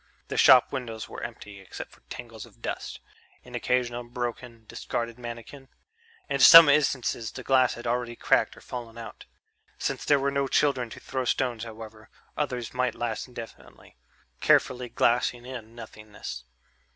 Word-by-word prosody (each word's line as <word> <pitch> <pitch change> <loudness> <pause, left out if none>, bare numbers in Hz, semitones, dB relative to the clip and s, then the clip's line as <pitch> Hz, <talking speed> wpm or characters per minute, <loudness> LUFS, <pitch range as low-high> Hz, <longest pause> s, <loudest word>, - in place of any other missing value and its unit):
The - - -4
shop 125 -2 +7
windows 115 -4 -5
were - - -9
empty, 100 -1 -8
except 95 - -9
for - - -21
tangles 115 -3 -9
of - - -23
dust... - - -5 0.5
an 125 - -14
occasional 120 0 -1
broken, 120 -1 -6
discarded 115 +2 -5
mannequin.... 120 +3 -9 0.6
In 140 - -1
some 165 +3 +11
instances 130 -5 +1
the 125 - -8
glass 130 -1 +3
had 120 - -10
already 120 0 -1
cracked - - +1
or - - -14
fallen 115 -2 -8
out. 115 -1 -10 0.5
Since - - -3
there 145 - +4
were 140 0 0
no 140 0 0
children 135 -4 +1
to - - -10
throw 130 -1 -4
stones, 120 -2 -1
however, 110 -1 -11 0.3
others 125 -6 -3
might 125 -2 0
last 115 0 -3
indefinitely, 120 -2 -12 0.4
carefully 125 -1 +2
glassing 120 +1 +1
in 120 -3 -9
nothingness. 105 - -9
120 Hz, 150 wpm, -27 LUFS, 115-130 Hz, 0.6 s, some